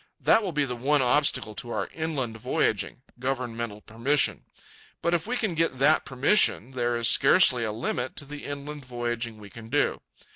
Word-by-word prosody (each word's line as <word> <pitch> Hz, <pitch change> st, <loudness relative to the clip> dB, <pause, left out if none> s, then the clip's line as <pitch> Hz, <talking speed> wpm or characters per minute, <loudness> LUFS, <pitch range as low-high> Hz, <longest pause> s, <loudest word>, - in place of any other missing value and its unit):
That 225 Hz, -, +4 dB
will 195 Hz, -4 st, -3 dB
be 150 Hz, -2 st, 0 dB
the 125 Hz, -2 st, -4 dB
one 135 Hz, +3 st, +1 dB
obstacle 125 Hz, -4 st, +2 dB
to 120 Hz, -, -6 dB
our -, -, -2 dB
inland 145 Hz, -8 st, -3 dB
voyaging—governmental 120 Hz, -1 st, -3 dB
permission. 130 Hz, +8 st, +1 dB, 0.6 s
But 170 Hz, -, +1 dB
if 175 Hz, +3 st, 0 dB
we 250 Hz, +2 st, -1 dB
can 215 Hz, -7 st, -1 dB
get 165 Hz, -5 st, 0 dB
that 150 Hz, +4 st, +3 dB
permission, 135 Hz, -, +3 dB
there 120 Hz, -2 st, -1 dB
is 115 Hz, -1 st, +1 dB
scarcely 135 Hz, -3 st, +5 dB
a 110 Hz, -, -2 dB
limit 125 Hz, +3 st, -3 dB
to 145 Hz, -, -5 dB
the 145 Hz, +1 st, -9 dB
inland 145 Hz, +1 st, -7 dB
voyaging 120 Hz, -2 st, -4 dB
we 105 Hz, -2 st, -13 dB
can 115 Hz, -1 st, -11 dB
do. 145 Hz, +4 st, 0 dB
130 Hz, 175 wpm, -26 LUFS, 120-150 Hz, 0.6 s, scarcely